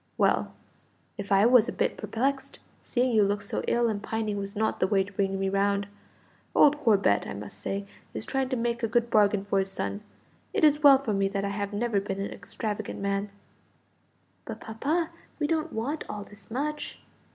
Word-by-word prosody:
"Well, - - +2 0.7
if 200 0 -6
I 195 +2 +6
was 240 -1 +6
a - - -1
bit - - 0
perplexed, 270 +3 -2 0.2
seeing 250 0 0
you 215 - +6
look 200 0 +1
so 200 - -3
ill 235 0 +2
and 210 -2 -2
pining 215 -1 -2
was 200 +1 -5
not 220 +1 0
the 185 - +3
way 195 -1 +3
to 200 +1 -12
bring 195 0 0
me 195 - 0
round. 200 +1 +1 0.7
Old 295 0 +6
Corbet, 205 - +3
I - - -5
must 100 -1 -8
say, 195 - -3 0.3
is - - -4
trying 270 -1 -1
to 260 - 0
make 235 0 -1
a 230 - +1
good 235 +1 +1
bargain 205 -2 +3
for 200 -1 +1
his 195 0 -1
son. 200 +1 -3 0.5
It - - 0
is 300 -1 +5
well 280 -2 +9
for 260 -5 -2
me 195 0 +2
that 200 0 -2
I - - -1
have 200 0 -3
never 210 -1 0
been 195 -1 -4
an 200 - -3
extravagant 215 -1 -5
man." 200 +1 -1 1.2
"But, - - -6
papa, 300 +10 -1 0.3
we 300 - 0
don't 320 +1 0
want 270 +8 -2
all 205 - -5
this 205 +3 -15
much." 295 +5 -3
210 Hz, 200 wpm, -28 LUFS, 200-250 Hz, 1.2 s, well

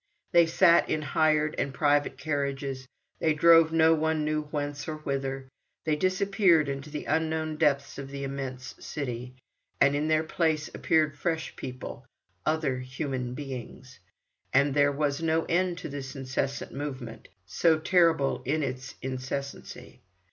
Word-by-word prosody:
They 170 -2 +6
sat 170 +1 +5
in 155 - 0
hired 155 +1 +2
and 140 - -1
private 145 -1 +1
carriages, 140 -2 -3 0.3
they 160 -2 +2
drove 165 +1 +6
no 160 0 +5
one 160 -1 0
knew 155 0 -1
whence 145 -1 -4
or 155 - -3
whither, 135 -2 -3 0.4
they 155 -1 +2
disappeared 185 -2 +3
into 140 +2 -4
the 150 0 -5
unknown 160 0 -1
depths 140 -3 +1
of 135 -1 -7
the 140 0 -6
immense 135 -1 -5
city, 125 -3 -5 0.4
and 140 0 +4
in 150 +2 0
their 155 0 +3
place 160 -2 0
appeared 155 -2 +2
fresh 160 0 -2
people, 125 -1 -7 0.4
other 155 -5 +1
human 130 -1 -4
beings, 130 -1 -8 0.5
and 140 +1 +3
there 145 0 +4
was 145 +1 -1
no 165 0 +1
end 180 0 +1
to - - -6
this 140 -1 -6
incessant 135 +1 -3
movement, 130 -5 -6 0.2
so 160 - +3
terrible 160 -4 +2
in 150 +4 0
its 130 -1 -5
incessancy. 135 +1 -6
145 Hz, 145 wpm, -28 LUFS, 135-160 Hz, 0.5 s, They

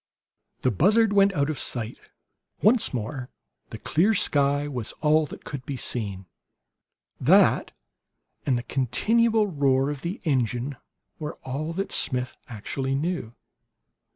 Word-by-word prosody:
The 130 - +2
buzzard 205 - +3
went 200 0 +5
out 140 -4 +1
of 145 - -5
sight. 115 -2 -4 0.6
Once 220 +3 +4
more 125 +2 -4 0.4
the - - -7
clear 200 +8 +2
sky 145 -3 +2
was 125 -6 -4
all 155 0 +2
that - - -11
could 140 -3 -6
be 135 0 -5
seen; 100 -7 -3 0.9
that, - - +4 0.7
and 130 -3 +1
the 120 - -4
continual 220 - +2
roar 140 -6 +1
of 145 -2 -6
the 175 +5 -4
engine, 130 - 0 0.4
were 150 -1 -5
all 145 +5 -3
that 195 +3 -3
Smith 125 0 +1
actually 130 +4 -3
knew. 145 -6 -3
140 Hz, 130 wpm, -25 LUFS, 125-170 Hz, 0.9 s, went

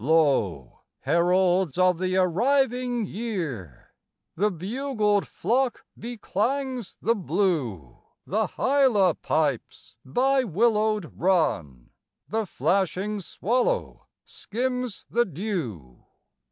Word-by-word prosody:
Lo, 135 - +1 0.2
heralds 180 -1 +2
of 185 -2 +3
the 185 0 0
arriving 245 +5 +1
year! 165 - -5 0.4
The 205 +5 +1
bugled 210 - -1
flock 250 +2 -1
beclangs 245 +1 -3
the 230 - +3
blue, 160 - -1 0.3
The 215 +3 0
hyla 255 - +3
pipes 150 -7 -2
by 265 - +2
willowed 215 -2 +1
run, 140 - 0 0.4
The 220 +6 -2
flashing 195 +3 0
swallow 250 - -1 0.2
skims 250 0 -3
the 240 +2 +2
dew. 145 - -5
195 Hz, 85 wpm, -25 LUFS, 165-235 Hz, 0.4 s, of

